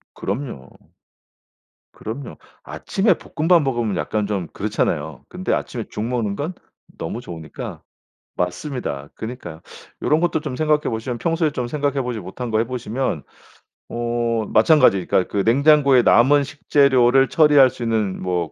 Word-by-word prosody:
그럼요. 100 - -5 1.3
그럼요. 120 +4 -7 0.3
아침에 195 +2 0
볶음밥 165 +2 +2
먹으면 120 -7 -1
약간 100 +7 -1
좀 100 -5 -2
그렇잖아요. 75 -1 -2
근데 - - -2
아침에 - - -3
죽 105 - -4
먹는 115 -4 -1
건 155 - -4 0.4
너무 105 +9 -5
좋으니까 80 -8 -8 0.5
맞습니다. 90 - -4
그니까요. 110 -9 -7 0.4
요런 155 - +2
것도 170 -2 +1
좀 150 -4 -5
생각해 150 +1 +2
보시면 115 +2 -3
평소에 165 +2 0
좀 125 -3 -3
생각해 140 +1 -1
보지 125 -3 -4
못한 105 +6 -6
거 110 - +2
해 115 - +1
보시면 120 - -3 0.7
어 120 -1 -1
마찬가지 110 - +5
그러니까 90 - +1
그 - - -3
냉장고에 140 0 +5
남은 140 +6 +5
식재료를 135 -3 +3
처리할 150 -5 +6
수 125 - -13
있는 110 -4 -1
뭐 90 -3 -2
120 Hz, 325 characters per minute, -21 LUFS, 105-140 Hz, 1.3 s, 처리할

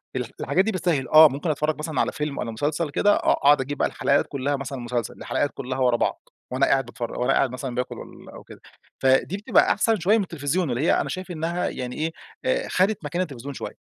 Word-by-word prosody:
ال 125 -1 -1 0.2
الحاجات 190 +2 +2
دي 220 - 0
بتسهل 170 -8 0
آه، 155 0 +8
ممكن 145 +5 -4
أتفرّج 155 +1 0
مثلًا 155 0 -1
على - - 0
فيلم 150 -2 -4
والّا 115 - -3
مسلسل 145 +7 -1
كده 205 +8 +3
آه، - - +2
أقعد 145 -1 +4
أجيب 145 +2 -4
بقى - - +2
الحلقات 140 +1 +1
كلّها 140 +1 -2
مثلًا 135 -1 -5
مسلسل 120 -1 -3
الحلقات 145 - -1
كلّها 130 0 -4
ورا 125 -2 +3
بعض - - -2 0.2
وأنا 130 +2 +2
قاعد 135 -2 +2
باتفرج، 120 -1 -6
وأنا 130 +2 +2
قاعد 130 - +2
مثلًا 125 -1 -5
باكل 125 0 -3
والاَّ - - -12
وكده، - - -14 0.4
فدي 135 +8 +2
بتبقى 210 - +3
أحسن 225 -3 +1
شويّة 205 +6 +3
من 205 - +1
التلفزيون، 165 0 -2
اللي 120 +3 -1
هي 160 - +3
أنا - - -4
شايف 185 -1 -5
إنّها 170 +2 -2
يعني 125 -1 -5 0.5
إيه - - 0
خدت 185 -3 +1
مكان 170 +5 -2
التلفزيون 140 -4 -5
شويّة. - - -7
145 Hz, 220 wpm, -24 LUFS, 130-175 Hz, 0.5 s, آه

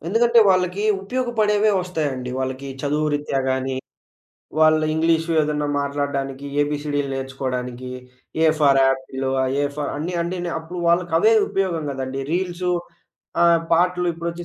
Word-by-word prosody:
ఎందుకంటే, 235 +5 +3
వాళ్ళకీ 185 +2 +1 0.2
ఉపయోగపడేవే 215 -2 +1
ఒస్తాయండి. 145 -8 -3
వాళ్ళకి 130 +1 -3
చదువు 150 +1 0
రిత్యా 145 -2 -1
గానీ, 130 0 -1 0.8
వాళ్ళ 155 0 +5
ఇంగ్లీషు 165 +1 +1
ఎదన్నా 150 -1 -1
మాట్లాడడానికి, 140 -1 -3 0.2
ఏబీసీడీలు 145 -1 -1
నేర్చుకోడానికి, 130 -2 -4 0.5
ఏ - - +6
ఫర్ 140 -2 +5
యాపిలు, 130 0 -1
ఆహ్, 130 0 0
ఏ - - +2
ఫర్ 145 -1 -2
అన్నీ 170 +4 -3
అండీనే 175 0 -3
అప్పుడు 175 +2 -7
వాళ్ళకవే 170 +4 +3 0.2
ఉపయోగం 190 -6 -1
గదండి. 135 0 -4
రీల్సు 180 0 -1 0.7
ఆహ్, 170 -1 +5
పాటలు 180 +1 +2
ఇప్పుడొచ్చే 170 +1 -5
155 Hz, 125 wpm, -22 LUFS, 135-180 Hz, 0.8 s, ఏ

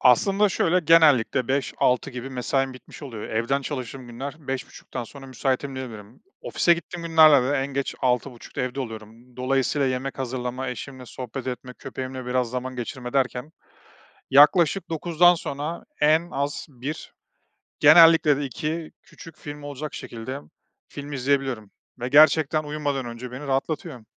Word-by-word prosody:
Aslında 195 - +4
şöyle, 180 0 +2
genellikle 140 -7 +4
17.00-18.00 130 -2 +1
gibi 125 +2 -7
mesaim 130 +1 -1
bitmiş 130 - -13
oluyor. 115 -7 -7
Evden 120 +5 0
çalıştığım 130 -2 -6
günler 130 +4 -6
17.30'dan 130 -1 -5
sonra 135 +3 -12
müsaitim 135 +1 -2
diyebilirim. 115 -4 -9 0.2
Ofise 170 - +3
gittiğim 170 0 -7
günlerde 155 -5 +6
de 145 - +2
en 135 0 0
geç 140 -1 -3
18.30'da 125 -1 -2
evde 125 +2 -3
oluyorum. 115 +1 -9
Dolayısıyla 135 +2 +1
yemek 130 +1 -3
hazırlama, 130 0 -3
eşimle 125 0 -7
sohbet 130 +1 -7
etme, 125 0 -5
köpeğimle 130 -1 -6
biraz 125 -1 0
zaman 130 +1 -4
geçirme 125 +1 -6
derken 135 +2 -1 0.8
yaklaşık 155 +6 +5
21.00'den 175 +2 +4
sonra 150 +1 -5 0.2
en 155 +3 +4
az 140 +1 -3
1 140 +3 -7 0.7
genellikle 165 -3 +7
de 145 - -3
2 155 +5 -4
küçük 165 0 -14
film 145 -1 -8
olacak 145 +1 -6
şekilde 120 +4 -6 0.5
film 145 0 -8
izleyebiliyorum 130 -5 -1 0.3
ve 125 - -2
gerçekten 155 +1 +5
uyumadan 145 -3 -3
önce 120 +1 -7
beni 135 +4 -7
rahatlatıyor. 135 -2 -2
135 Hz, 140 wpm, -24 LUFS, 125-150 Hz, 0.8 s, genellikle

